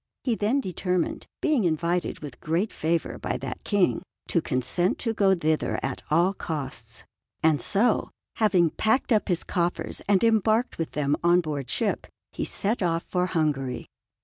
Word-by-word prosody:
He 245 - +1
then 225 +6 +1
determined, 180 -3 -2
being 300 -8 +2
invited 170 +1 0
with 145 -5 -8
great 170 +7 0
favour 165 +1 -1
by - - -2
that - - -6
King, 205 -3 +2 0.3
to 170 - +2
consent 155 +7 0
to 230 -2 -2
go 195 -3 +4
thither 155 -2 0
at 135 -1 -3
all 170 +6 +3
costs; 150 -8 -6 0.4
and 155 -2 +4
so, 215 +3 +2 0.3
having 185 -7 +3
packed 220 +4 +1
up 215 -2 +3
his 175 -3 0
coffers 175 -1 -2
and 200 0 +4
embarked 225 +1 +2
with 165 - -3
them 145 -1 +1
on 175 +1 +5
board 145 -6 -3
ship, - - -1 0.2
he - - -3
set 210 +3 -1
off 170 -2 +1
for 180 0 +1
Hungary. 145 -7 -1
175 Hz, 160 wpm, -26 LUFS, 155-205 Hz, 0.4 s, on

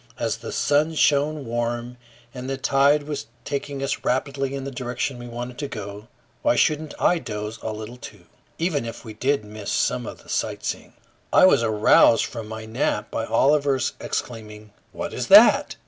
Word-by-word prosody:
As 115 -1 -1
the 115 0 -7
sun 150 +3 +1
shone 150 0 +2
warm 120 +1 -3 0.4
and 130 0 -6
the 135 - -2
tide 140 +2 +3
was 145 -5 -5 0.2
taking 140 -1 -4
us 135 - -2
rapidly 135 +1 -1
in 135 - -5
the 140 - -5
direction 125 0 -3
we 120 - -8
wanted 120 +1 -7
to 145 - -3
go, 105 -2 -8 0.3
why - - +3
shouldn't 155 +3 +1
I 175 - +3
doze 105 -3 -6
a 110 - -3
little 110 +3 -7
too, 105 -7 -12 0.3
even 160 -5 0
if 115 +1 -8
we 110 - -8
did 130 +1 0
miss 105 -1 -7
some - - 0
of - - -9
the - - -21
sightseeing? - - -3 0.4
I - - +7
was 185 - +5
aroused 110 0 +5
from 115 -3 -7
my 110 0 -7
nap 110 -2 -2
by 115 - -2
Oliver's 135 +3 +2
exclaiming, 105 -2 -6 0.2
"What - - -5
is - - -3
that?" - - +7
120 Hz, 180 wpm, -23 LUFS, 110-140 Hz, 0.4 s, I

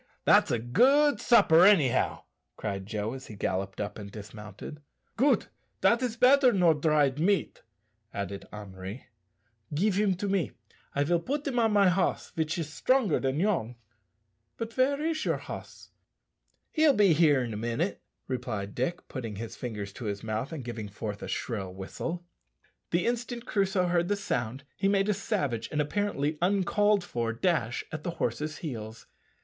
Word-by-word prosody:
that's - - +5
a 120 - +1
good 265 - +4
supper, 175 -8 +6
anyhow," 180 -11 +4 0.3
cried 100 -2 -4
Joe, 105 +2 -3
as 130 0 -8
he 110 - -9
galloped 95 0 -2
up 105 0 -4
and 100 -1 -8
dismounted. 105 +6 -9 0.3
"Goot! 275 +5 +2 0.3
dat 235 +1 +4
is 240 -3 -2
better 255 +1 +6
nor 180 -6 +4
dried 150 -2 +2
meat," 195 +4 +1 0.5
added 100 0 -5
Henri. 100 +2 -8 0.7
"Give 200 +6 +2
him 200 -1 +2
to 200 +3 -3
me; 195 -3 0 0.4
I 140 - +2
will 170 +3 +2
put 285 - -3
him 260 -4 0
on 225 -2 +3
my 200 -2 +5
hoss, 185 +1 0
vich 160 +1 -2
is 165 -3 -2
strongar 255 - +2
dan 135 +2 0
yourn. 165 - 0 0.8
But 230 0 -5
ver 275 +2 +2
is 315 0 -1
your - - +1
hoss?" - - -9 0.8
"He'll 310 -2 +4
be 200 -5 +5
here 150 -4 +4
in 115 -2 -4
a - - -4
minute," 120 - -2 0.3
replied 110 -6 -3
Dick, 170 +9 -3
putting 115 -6 -5
his 115 +3 -6
fingers 105 -5 -5
to 120 - -8
his 100 -1 -3
mouth 110 +5 -3
and 150 -7 -6
giving 115 -4 -5
forth 105 0 -6
a - - -5
shrill 100 -6 -3
whistle. 165 - -5 0.6
The 170 +1 +1
instant 240 0 -2
Crusoe 195 -4 +1
heard 175 -1 +1
the 205 - +1
sound 140 - -3
he 195 - 0
made 200 0 +2
a - - +4
savage 145 - -2
and 150 - -1
apparently 150 -2 -1
uncalled 200 +2 +2
for 115 -6 -2
dash 120 -4 0
at 155 - -5
the 175 - -2
horse's 150 +6 -2
heels. 110 -5 -6
155 Hz, 165 wpm, -29 LUFS, -, 0.8 s, supper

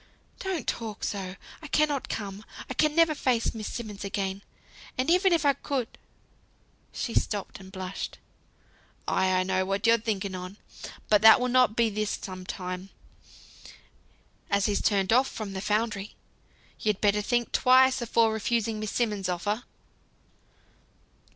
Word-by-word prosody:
"Don't 375 -7 -3
talk 220 -3 -4
so; 190 -3 -3 0.3
I 310 - -8
cannot 295 -2 +1
come, 200 -1 -5 0.2
I - - -4
can 305 +3 +2
never 330 -2 +5
face 250 -5 0
Miss 220 -2 -5
Simmonds 210 -4 -6
again. 195 0 -3 0.6
And 260 +6 +1
even 365 +2 +4
if 330 -3 +2
I 280 - +5
could 265 -4 -3 0.5
" - - -38
she 235 - -4
stopped, 205 -2 -1
and 190 -1 -12
blushed. 185 0 -5 0.9
"Ay! 190 0 +2
I 185 0 +2
know 185 0 0
what 195 +2 -2
you're 230 0 +5
thinking 200 -3 -2
on. 185 +2 -7 0.5
But 210 -2 +4
that 220 +1 +9
will 250 0 0
not 250 -3 +4
be 230 -2 +2
this 210 0 -2
some 185 -1 -8
time, 185 +1 -5 1.6
as 200 -1 +2
he's 205 -1 +1
turned 195 0 +2
off 260 +2 +4
from 210 -6 -6
the 190 - -4
foundry, 210 -1 -1 0.6
you'd 210 -2 0
better 210 0 +2
think 240 +3 0
twice 260 0 +5
afore 230 -1 +2
refusing 220 0 -1
Miss 215 -1 -3
Simmonds' 210 -6 -1
offer." 205 +7 -2
215 Hz, 150 wpm, -27 LUFS, 195-245 Hz, 1.6 s, that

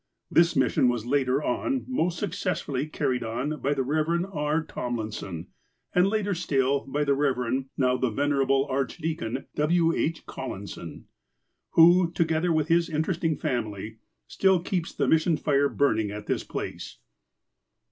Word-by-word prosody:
This 170 0 +4
mission 130 -1 +3
was, 120 -2 -2
later 135 +1 +1
on, 260 - -1
most 180 -9 0
successfully 165 -7 -2
car 155 - -1
ried 125 -1 -1
on 125 +7 -3
by 145 +2 +1
the 135 - 0
Rev. 155 +5 0
R. 150 +1 0
Tomlinson, 110 - -5 0.4
and 180 +1 +4
later 205 -1 0
still 140 -5 +1
by 145 +2 0
the 140 -1 +2
Rev. 130 -2 0
(now 125 -2 +2
the 130 - 0
Venerable 135 +2 +1
Archdeacon) 135 -1 -3
W. 165 +2 +2
H. 165 +1 -2
Collison, - - -7 0.7
who, 170 +1 +6
together 165 +1 +1
with 155 -2 +1
his 170 0 +2
interesting 160 0 0
family, 110 -6 -3 0.3
still 190 -2 +2
keeps 175 -1 -2
the - - -1
missionary 160 0 +3
fire 140 -1 +2
burning 110 -7 +1
at 105 +1 -7
this - - -1
place. - - -6
145 Hz, 145 wpm, -26 LUFS, 130-165 Hz, 0.7 s, who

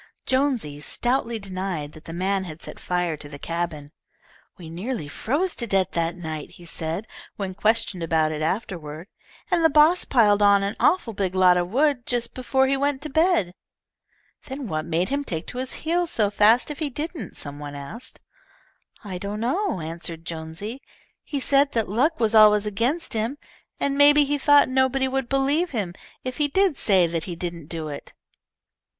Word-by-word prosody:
Jonesy 260 - 0
stoutly 240 - -1
denied 185 -6 -4
that 155 - -15
the - - -7
man 190 +3 -1
had 160 -2 -9
set - - -7
fire 180 -2 -1
to 145 0 -9
the 145 - -8
cabin. 165 -2 -4 0.7
"We 170 - -10
nearly 180 - -4
froze 295 - -1
to 235 - -1
death 195 -2 +1
that 170 0 -1
night," 160 -3 -5
he 175 - -14
said, 165 +4 -4 0.3
when 195 -2 -4
questioned 215 -2 +1
about 160 -1 +1
it 155 0 -4
afterward, 165 -1 -3 0.4
"and 345 -2 +3
the 320 - +6
boss 310 +4 +5
piled 210 -5 +4
on 200 -1 +5
an 200 +2 -2
awful 300 -11 +2
big 190 -2 -2
lot 185 -1 +6
of 175 0 0
wood 270 +1 +1
just 240 -1 -1
before 265 +1 +1
he 270 +1 +2
went 280 0 -1
to 305 - -6
bed." 320 - +2 0.9
"Then 265 -1 -5
what 155 -3 -2
made 170 +2 0
him 285 +1 -1
take 165 - -4
to 250 - -5
his 260 0 -3
heels 345 +1 +1
so 210 -9 +1
fast 220 +7 +4
if 295 - -7
he 305 -3 -1
didn't?" 310 +5 -6
some 145 0 -6
one 145 -1 -7
asked. 145 - -8 0.8
"I 190 -4 -6
don't 200 +2 -4
know," 255 - -1
answered 165 +1 -6
Jonesy. 170 +10 -6 0.4
"He 285 - -3
said 275 +1 +3
that 225 -2 +1
luck 280 - +1
was 225 -1 +2
always 210 -1 +7
against 235 +11 -1
him, 225 +5 -1 0.4
and 280 0 0
maybe 290 0 +7
he 290 +1 -1
thought 290 +1 +6
nobody 265 +1 +2
would 265 -2 -2
believe 280 +6 +1
him 205 - -3 0.3
if 255 -1 -4
he 295 - +2
did 380 +2 +2
say 190 -4 +4
that 165 -1 -2
he 175 - -5
didn't 170 -3 -6
do 160 -2 -5
it." 145 -1 -8
210 Hz, 185 wpm, -24 LUFS, 170-270 Hz, 0.9 s, always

